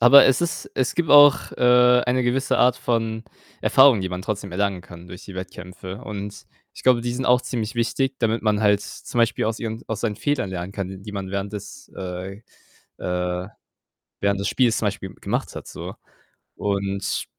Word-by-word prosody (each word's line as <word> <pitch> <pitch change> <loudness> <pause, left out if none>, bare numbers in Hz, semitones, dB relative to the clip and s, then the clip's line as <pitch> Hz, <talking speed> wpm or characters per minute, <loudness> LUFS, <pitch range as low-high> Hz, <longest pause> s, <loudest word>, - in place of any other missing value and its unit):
aber 125 +4 +9
es 135 +2 +3
ist 170 -1 -3
es 130 0 0
gibt 165 -2 0
auch, 145 -1 +7
äh, 125 0 +5
eine 125 +1 +2
gewisse 130 +1 +1
Art 125 0 +4
von 115 -2 -1 0.4
Erfahrung, 130 -5 +6
die 95 - -2
man 90 0 -5
trotzdem 100 -2 -4
erlangen 95 -1 -1
kann 85 0 -13
durch 90 - -10
die 95 - -10
Wettkämpfe 95 +1 -8
und 105 -1 -7 0.3
ich - - -11
glaube, 125 -2 +5
die 120 0 -2
sind 130 +2 -3
auch 125 0 +5
ziemlich 115 -2 -3
wichtig, 125 +3 0
damit 115 -1 +1
man 105 -1 +1
halt 105 -1 +3
zum 120 - -7
Beispiel 115 -1 +2
aus 110 +1 -1
ihren 110 0 -5
aus 110 - -3
seinen 110 -3 -1
Fehlern 145 -5 -1
lernen 90 0 -5
kann, 95 -1 -6
die 105 +1 -8
man 95 -2 -5
während 100 +1 -3
des 105 -1 -9
äh, 95 +2 -6 0.6
äh, 90 +1 -2 0.7
während 100 0 +1
des 100 - -1
Spiels 120 -4 +2
zum - - -1
Beispiel 95 -2 -5
gemacht - - -3
hat - - -8
so - - -8 0.6
und 100 -1 -2
105 Hz, 190 wpm, -23 LUFS, 95-125 Hz, 0.7 s, aber